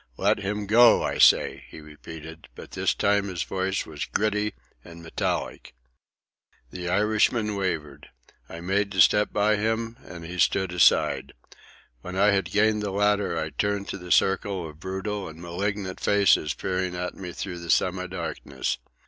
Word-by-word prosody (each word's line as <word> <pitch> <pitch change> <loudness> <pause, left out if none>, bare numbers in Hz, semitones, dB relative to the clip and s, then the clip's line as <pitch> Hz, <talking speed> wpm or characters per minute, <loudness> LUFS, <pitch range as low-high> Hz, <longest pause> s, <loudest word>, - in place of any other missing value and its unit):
"Let 100 +2 +2
him 100 +1 -3
go, 115 +4 +6
I - - -2
say," - - +4
he - - -11
repeated; 80 +1 -11
but - - -11
this - - 0
time 100 0 +1
his 90 -3 -3
voice 95 0 -2
was 75 -2 -5
gritty 105 0 -1 0.3
and 85 0 -12
metallic. 80 -5 -3 1.0
The 90 -1 -5
Irishman 105 +2 +1
wavered. 80 -8 -4 0.4
I 85 - -8
made 100 +3 0
to 95 - -3
step 105 +4 +5
by 105 +1 +2
him, 115 +2 -2
and 85 -2 -10
he 90 +2 -7
stood 95 +2 +2
aside. 90 -2 +3 0.7
When 90 +6 -7
I 100 +2 +4
had 100 -1 +1
gained 105 +1 +2
the 105 - -2
ladder, 105 0 +1
I - - -3
turned 100 -1 -2
to 100 - -5
the 90 0 -9
circle 95 -2 +1
of 75 0 -13
brutal 95 +3 -4
and 80 +1 -12
malignant 95 +2 -4
faces 100 -7 +3
peering 90 -1 -2
at 90 0 -4
me 90 -2 -8
through 90 0 -6
the 85 0 -9
semi 90 0 +1
darkness. 85 -6 -4
95 Hz, 165 wpm, -25 LUFS, 85-105 Hz, 1.0 s, go